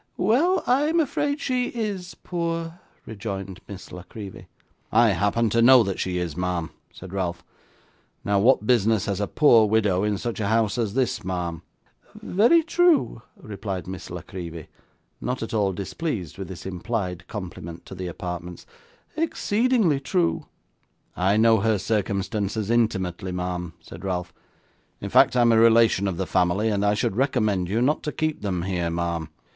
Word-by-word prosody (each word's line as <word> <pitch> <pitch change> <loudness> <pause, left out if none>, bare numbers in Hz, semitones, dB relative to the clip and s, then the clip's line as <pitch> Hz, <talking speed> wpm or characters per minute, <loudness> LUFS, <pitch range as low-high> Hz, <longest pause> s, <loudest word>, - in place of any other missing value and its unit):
'Well, 305 - +2
I'm 295 +7 +2
afraid 290 -1 0
she 255 -4 0
IS 205 -6 -4
poor,' 165 -1 -3 0.3
rejoined 100 -3 -6
Miss 100 -3 -10
La 90 - -8
Creevy. 100 +2 -10 0.4
'I 115 0 +5
happen 105 +4 +1
to 115 - +3
know 125 0 +8
that 95 -2 -3
she 90 -1 -1
is, 85 -4 -3
ma'am,' 90 -2 -2 0.2
said 95 0 -11
Ralph. 90 -3 -3 0.8
'Now, 100 -1 +2
what 115 0 +4
business 110 -3 +3
has 100 -2 -2
a 105 - 0
poor 115 -8 +5
widow 105 -4 +2
in 105 -1 0
such 115 +4 -4
a 105 - -1
house 110 0 +1
as 110 -2 -1
this, 125 -4 0
ma'am?' 90 -2 -3 0.5
'Very 240 - +3
true,' 340 - +2 0.2
replied 100 -3 -5
Miss 90 -2 -7
La 90 0 -6
Creevy, 85 -4 -8 0.5
not 125 -1 -2
at 115 - -6
all 105 -3 +2
displeased 100 - -4
with 95 - -5
this 95 -2 -9
implied 95 -2 -4
compliment 85 -4 -7
to - - -10
the 95 -1 -5
apartments. 90 0 -6 0.5
'Exceedingly 235 - +1
true.' 170 +5 0 0.7
'I 95 +3 +2
know 110 0 +5
her 110 +1 +2
circumstances 100 +1 -1
intimately, 95 -5 0
ma'am,' 90 -1 -4
said 85 +1 -12
Ralph; 90 -3 -3 0.7
'in - - -6
fact, - - +5
I 125 - +4
am 120 -1 +5
a 110 - +5
relation 115 -3 +5
of 95 -3 -2
the 95 - -1
family; 95 +4 +1
and 100 -2 0
I 105 0 +3
should 95 - -1
recommend 105 -8 +1
you 115 +5 +1
not 150 +4 +1
to 150 - -3
keep 155 0 -2
them 90 -4 -2
here, 90 -3 -1
ma'am. 85 -1 -2
105 Hz, 165 wpm, -24 LUFS, 90-125 Hz, 0.8 s, know